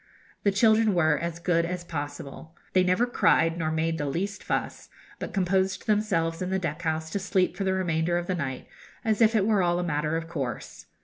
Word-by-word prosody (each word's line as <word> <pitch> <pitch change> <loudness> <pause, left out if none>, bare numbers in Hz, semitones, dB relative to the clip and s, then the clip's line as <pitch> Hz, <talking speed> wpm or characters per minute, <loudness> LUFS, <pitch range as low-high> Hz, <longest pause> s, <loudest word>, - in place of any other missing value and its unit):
The 205 - +3
children 220 0 +4
were 160 -3 +3
as 170 -1 -3
good 170 -1 +1
as 175 +1 -3
possible. 145 0 -7 0.2
They 185 - +4
never 185 +6 +2
cried 170 -8 +2
nor 160 -1 0
made 160 +1 -1
the 145 - -1
least 190 +7 -3
fuss, - - -3 0.3
but - - -5
composed 190 0 0
themselves 190 -6 0
in 185 - -2
the 190 - +1
deck 170 -3 -3
house 160 -1 -2
to 200 - -1
sleep 190 -2 +1
for 195 - -3
the 190 - +2
remainder 175 -2 0
of 175 - -2
the 185 - -1
night, 135 -7 -4 0.4
as 220 0 +1
if 225 0 +5
it 200 -3 +3
were 210 -2 +3
all 175 -1 +2
a 180 - -1
matter 155 -1 -1
of 165 0 -5
course. 135 -9 -5
175 Hz, 210 wpm, -27 LUFS, 160-190 Hz, 0.4 s, if